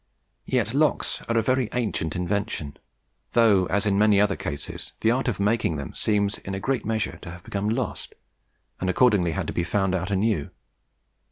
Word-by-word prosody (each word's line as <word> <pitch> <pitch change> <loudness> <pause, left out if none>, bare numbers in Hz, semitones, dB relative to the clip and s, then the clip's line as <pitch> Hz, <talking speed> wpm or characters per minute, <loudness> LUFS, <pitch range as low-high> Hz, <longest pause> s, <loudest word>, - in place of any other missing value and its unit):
Yet - - 0
locks - - +1
are 115 - +2
a 115 - +3
very 130 -1 +1
ancient 105 -10 -1
invention, 90 -4 -2 0.6
though, 105 -6 +4
as 100 +3 +1
in 100 -1 +2
many 105 -1 +5
other 100 -1 +3
cases, 70 - -5
the 110 - +4
art 130 +3 0
of 115 -7 -1
making 105 -4 +1
them 70 -2 -6
seems 105 -1 0
in 95 - -5
a - - -3
great 130 +5 -1
measure 110 -1 -1
to 90 - -8
have 85 +1 -10
become 105 -1 -2
lost, 115 -1 -3 0.6
and 95 - -1
accordingly 95 -5 +3
had - - -2
to - - -4
be 85 - 0
found 95 +2 0
out 95 0 -1
anew. 100 -5 0
100 Hz, 185 wpm, -25 LUFS, 95-110 Hz, 0.6 s, many